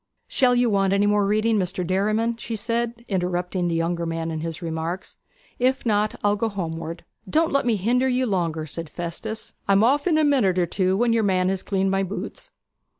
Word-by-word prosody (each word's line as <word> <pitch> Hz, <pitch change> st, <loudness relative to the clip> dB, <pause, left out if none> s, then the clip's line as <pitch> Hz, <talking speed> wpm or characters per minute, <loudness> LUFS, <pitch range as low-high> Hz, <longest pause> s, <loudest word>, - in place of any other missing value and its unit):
'Shall 250 Hz, -2 st, +3 dB
you 245 Hz, 0 st, +3 dB
want 195 Hz, -3 st, +2 dB
any 200 Hz, +1 st, +3 dB
more 205 Hz, -1 st, +3 dB
reading, 215 Hz, +1 st, +2 dB
Mr. 185 Hz, -1 st, -1 dB
Derriman?' 215 Hz, +6 st, +1 dB
said 230 Hz, +1 st, -2 dB
she, 235 Hz, -, -21 dB
interrupting 180 Hz, -1 st, -1 dB
the 170 Hz, -, 0 dB
younger 170 Hz, +1 st, -1 dB
man 165 Hz, 0 st, -3 dB
in 160 Hz, -, -3 dB
his 165 Hz, -1 st, -4 dB
remarks. 165 Hz, +1 st, -4 dB, 0.4 s
'If 260 Hz, +1 st, +1 dB
not, 210 Hz, -1 st, +1 dB
I'll 205 Hz, 0 st, +3 dB
go 225 Hz, +2 st, -1 dB
homeward.' 165 Hz, -4 st, -5 dB, 0.2 s
'Don't 320 Hz, -, +2 dB
let 275 Hz, -2 st, +1 dB
me 230 Hz, -, +3 dB
hinder 240 Hz, +6 st, +1 dB
you 255 Hz, 0 st, +1 dB
longer,' 170 Hz, -7 st, -1 dB
said 165 Hz, +1 st, -6 dB
Festus. 175 Hz, +7 st, -6 dB
'I'm 200 Hz, +1 st, +4 dB
off 285 Hz, +7 st, +3 dB
in 325 Hz, -3 st, +3 dB
a 310 Hz, -, +3 dB
minute 250 Hz, -11 st, +3 dB
or 180 Hz, -, +3 dB
two, 185 Hz, +2 st, 0 dB
when 235 Hz, +1 st, +2 dB
your 230 Hz, -, +3 dB
man 185 Hz, -3 st, +2 dB
has 190 Hz, -1 st, -1 dB
cleaned 195 Hz, -1 st, 0 dB
my 195 Hz, 0 st, +1 dB
boots.' 195 Hz, +1 st, -5 dB
195 Hz, 205 wpm, -24 LUFS, 175-230 Hz, 0.4 s, I'm